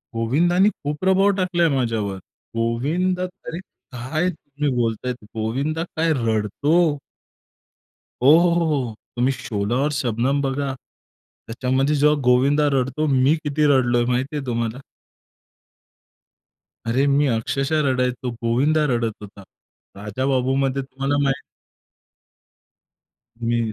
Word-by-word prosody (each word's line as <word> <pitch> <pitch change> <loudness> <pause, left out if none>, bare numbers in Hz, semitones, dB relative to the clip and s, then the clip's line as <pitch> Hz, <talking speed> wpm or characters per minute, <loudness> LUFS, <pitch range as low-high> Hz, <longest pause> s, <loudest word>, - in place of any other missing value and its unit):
गोविंदाने 175 - +3
खूप 145 -7 -5
प्रभाव 190 +2 +4
टाकलाय 175 -3 +1
माझ्यावर. 110 -6 -1 0.4
गोविंदा 155 +11 0
अरे 180 -2 -7 0.4
काय 155 +9 -1
तुम्ही 150 -3 -4
बोलतायत, 120 0 -2
गोविंदा 140 +9 -2
काय 165 -1 -1
रडतो? 110 +5 -1 1.5
हो, 135 - +7
हो. 175 0 +4
हो, 170 -1 +1 0.2
हो. 110 -2 -7 0.2
तुम्ही 125 +2 +2
शोला 115 -3 -3
और 150 - 0
शबनम 130 +1 0
बघा. 135 0 -2 0.7
त्याच्यामध्ये 130 +5 0
जेव्हा 150 +1 +4
गोविंदा 140 +4 +3
रडतो. 135 +3 0
मी 135 +2 +3
किती 150 +1 0
रडलोय 120 -1 +2
माहिती 130 +4 -1
आहे 140 -2 -3
तुम्हाला? 120 +1 -2 2.1
अरे 130 +5 +2
मी 140 +1 +3
अक्षरशः 135 +6 0
रडायचो, 125 -1 -1
गोविंदा 145 +7 +2
रडत 115 -2 0
होता. 100 -1 -11 0.6
राजाबाबूमध्ये 130 +5 0
तुम्हाला 135 +2 -2
माहित 135 -1 0 2.0
मी 120 0 0
135 Hz, 110 wpm, -22 LUFS, 120-150 Hz, 2.1 s, हो